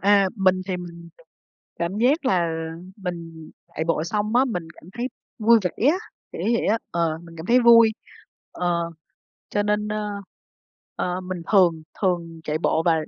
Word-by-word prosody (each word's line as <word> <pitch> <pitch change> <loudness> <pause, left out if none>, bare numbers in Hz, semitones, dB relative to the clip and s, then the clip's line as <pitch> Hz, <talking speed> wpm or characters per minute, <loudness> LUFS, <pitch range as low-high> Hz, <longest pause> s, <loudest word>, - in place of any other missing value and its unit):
a, 200 -1 +5
mình 185 -1 +3
thì 185 -2 -1
mình 170 -1 -9 0.7
cảm 170 +4 -2
giác 270 +7 +2
là, 190 -9 +3
ờ, 165 -1 -3 0.2
mình 165 -4 -7 0.2
chạy 160 - -4
bộ 165 -1 +1
xong 210 +4 -1
á, 260 +2 +5
mình 180 -9 -3
cảm - - -18
thấy 240 +1 -2 0.3
vui 230 +1 +6
vẻ 190 +8 0
á, 355 - 0 0.3
kiểu - - -6
như 220 - 0
vậy - - -1
á, 220 +3 +3
ờ, 165 -2 0
mình 165 -1 -13
cảm 160 - -7
thấy 245 +3 +5
vui. 230 -2 +7 0.6
Ờ, 170 -1 -1 0.6
cho 205 - 0
nên, 210 0 0
a, 210 0 -2 0.9
ờ, 180 +1 -2
mình 185 -1 -5
thường 170 -6 +4 0.2
thường 170 -3 -1
chạy 155 0 -1
bộ 160 0 +1
và 170 - +4
180 Hz, 180 wpm, -24 LUFS, 170-210 Hz, 0.9 s, vui